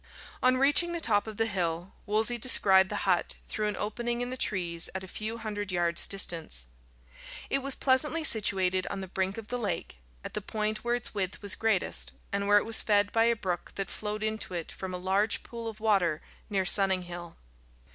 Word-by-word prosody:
On 255 0 +4
reaching 290 +6 +4
the 340 - -2
top 215 -8 +1
of 215 -2 -7
the 225 - +2
hill, 175 -3 -2
Wolsey 220 +3 +1
descried 190 -5 +6
the 210 - -3
hut 180 -3 +2
through 215 -1 -2
an 210 - -3
opening 235 +3 -2
in 245 +1 -3
the - - -3
trees 175 -8 -1
at 190 - -4
a - - -9
few 220 +4 -4
hundred 205 -3 -5
yards' 170 -1 +3
distance. 165 - -2 0.9
It 275 - +2
was 275 0 -2
pleasantly 300 +5 +1
situated 190 - +3
on 200 -1 -4
the 190 - -6
brink 190 +2 -2
of 225 -1 -8
the 245 - -3
lake, 205 - -4 0.3
at - - -7
the 210 - -3
point 215 +1 -3
where 240 0 +1
its 245 - -1
width 195 -1 -3
was 200 -2 +2
greatest, 175 - -1 0.2
and 200 0 -1
where 205 0 +6
it - - +2
was 225 0 +3
fed 205 -1 +2
by 225 0 +3
a 235 0 +3
brook 180 -5 -4
that 195 - -4
flowed 210 0 -4
into 215 -4 -2
it 170 -2 -4
from 190 -1 -7
a - - -3
large 195 +4 0
pool 230 -1 -7
of 220 -1 -7
water 195 -8 +1 0.3
near 195 -3 0
Sunninghill. 180 -3 0
205 Hz, 205 wpm, -29 LUFS, 185-225 Hz, 0.9 s, descried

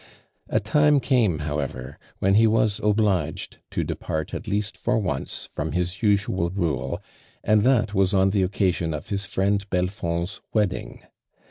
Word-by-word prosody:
A - - +2
time 145 +7 +3
came 120 - +2
however 70 -2 -4 0.2
when 95 +1 +2
he 110 +2 +6
was 110 -2 +2
obligetl 105 -3 0
to - - -1
depart 80 -1 -4
at - - -5
least 105 +1 -1
for 120 0 0
once 75 -11 -3
from 75 +1 -3
his 90 +1 -2
usual 100 -5 +1
rule, 85 -7 -2 0.5
an<l 110 0 +4
that 115 -5 +3
was 95 -2 +2
on 95 -1 +3
the 100 -1 +2
occasion 90 -4 0
of 75 - -8
his 100 -1 -2
friend 100 +1 0
Belfond's 90 -1 -2
wedding. 105 -4 -1
100 Hz, 150 wpm, -24 LUFS, 85-105 Hz, 0.5 s, he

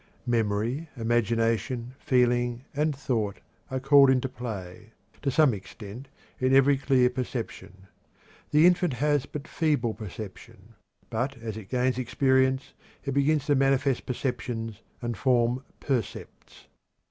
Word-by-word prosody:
Memory, 115 +6 0
imagination, 115 +1 0
feeling, 120 0 +1
and 150 0 +1
thought 110 -7 -2 0.3
are 130 -1 -2
called 135 0 +6
into 130 0 +2
play, 110 -4 -7 0.3
to 140 - 0
some 145 -1 +4
extent, 105 +5 -9 0.3
in 130 +1 +3
every 135 +1 +6
clear 130 -2 +3
perception. 120 -6 -5 0.6
The 150 +2 +5
infant 180 -3 +4
has 145 +2 +1
but 150 +1 -7
feeble 150 -8 0
perception, 105 -2 -10 0.4
but 130 +5 -2
as 115 -2 -6
it 105 -3 -9
gains 125 0 +1
experience 130 +2 +1 0.3
it 140 - -1
begins 140 +1 +2
to 145 - +3
manifest 135 -1 +2
perceptions 115 -4 -3 0.2
and 120 -1 -2
form 125 +1 +2 0.2
percepts. 125 -7 -4
125 Hz, 125 wpm, -27 LUFS, 115-135 Hz, 0.6 s, called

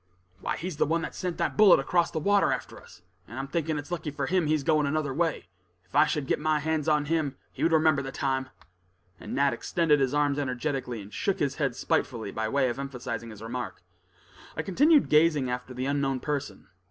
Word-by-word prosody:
"Why - - -3
he's 175 -2 -5
the - - +2
one 165 +2 0
that - - -5
sent 180 -2 -4
that - - -1
bullet 210 -7 +7
across 170 +5 +1
the - - -5
water 200 +5 +3
after - - -4
us, 90 0 -17 0.2
and 120 - -9
I'm 135 +1 -3
thinking 160 +1 -1
it's 145 +3 -7
lucky 165 -3 -3
for 140 -1 -3
him, 180 +1 +1
he's 155 -2 +1
going 155 -2 +2
another 145 -2 -1
way. 165 +2 -1 0.4
If 90 - -16
I 150 +2 +6
should 150 -4 -1
get - - 0
my 155 0 +1
hands 155 0 -1
on 150 -1 +2
him, 150 -3 -1
he - - -10
would 165 - +3
remember 155 -3 +4
the 135 0 -6
time." 130 -2 -1 0.7
And - - -6
Nat 140 0 +3
extended 160 -4 +1
his 135 +1 +1
arms 145 -1 +2
energetically, 130 -4 -3
and 100 - -14
shook 195 - 0
his 140 -1 -1
head 135 -5 0
spitefully 115 -5 -1
by 110 0 -2
way 135 +1 +2
of 120 - -4
emphasizing 125 -4 -5
his 110 -1 -10
remark. 120 -4 -5 0.7
I 160 - -1
continued 290 - +4
gazing 150 -4 +3
after 125 +1 -4
the 125 +1 -4
unknown 135 -1 0
person. 140 -8 -4
145 Hz, 215 wpm, -27 LUFS, 130-160 Hz, 0.7 s, bullet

